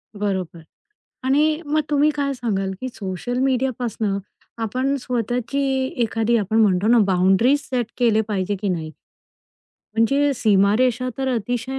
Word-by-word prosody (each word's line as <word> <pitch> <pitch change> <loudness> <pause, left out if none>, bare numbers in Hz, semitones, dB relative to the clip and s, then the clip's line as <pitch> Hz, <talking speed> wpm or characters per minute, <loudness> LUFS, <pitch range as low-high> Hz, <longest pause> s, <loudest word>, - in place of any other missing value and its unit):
बरोबर. 190 -5 -3 0.6
आणि 305 +4 +2
मग 305 +2 +1
तुम्ही 295 +1 +3
काय 280 -1 -1
सांगाल, 195 -6 -2
की 255 - -3
सोशल 200 +5 -4
मीडियापासनं 245 -6 -1 0.4
आपण 255 +5 -1
स्वतःची, 245 +2 -2 0.4
एखादी 225 +1 +1
आपण 215 +1 -1
म्हणतो 195 -1 +3
ना, 235 +1 +5
बाउंडरीज 195 +9 +3
सेट 245 -3 0
केल्या 220 -3 +3
पाहिजेत 200 -1 -1
की 205 - -1
नाही? 160 -3 -2 1.0
म्हणजे 275 +6 +2
सीमारेषा 230 +4 +2
तर 265 - -1
अतिशय 245 +4 -3
235 Hz, 125 wpm, -21 LUFS, 200-260 Hz, 1.0 s, ना